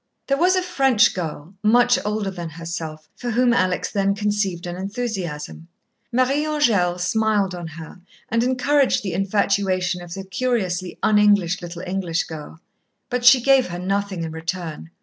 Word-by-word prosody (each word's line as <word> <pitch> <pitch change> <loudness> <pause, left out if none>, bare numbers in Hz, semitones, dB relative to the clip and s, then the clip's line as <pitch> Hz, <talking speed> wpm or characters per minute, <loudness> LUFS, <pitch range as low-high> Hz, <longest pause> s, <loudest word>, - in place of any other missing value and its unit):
There 275 - +1
was 360 +4 +3
a 370 - +1
French 270 -10 +3
girl, 165 -1 -5
much 240 +3 +4
older 210 -1 -2
than 175 -3 -6
herself, 160 -1 -6
for 245 - -5
whom 240 +1 +3
Alex 185 -4 0
then 200 -1 +1
conceived 205 -4 -1
an 175 0 -4
enthusiasm. 190 -7 -5 0.4
Marie 255 +4 +2
Angèle 225 -13 +1
smiled 205 0 +1
on 175 -2 -6
her 160 +2 -10 0.3
and 230 +1 +1
encouraged 260 +1 +2
the 190 -4 -3
infatuation 190 -1 0
of 175 0 -8
the 195 - -6
curiously 190 -3 -2
un 210 -1 +4
English 200 -3 +3
little 175 0 -7
English 180 -3 -1
girl. 160 0 -9 0.5
But 250 0 -1
she 245 +1 +9
gave 270 0 +4
her 175 0 -5
nothing 195 -1 -2
in 160 - -4
return. 165 0 -5
195 Hz, 160 wpm, -22 LUFS, 175-235 Hz, 0.5 s, she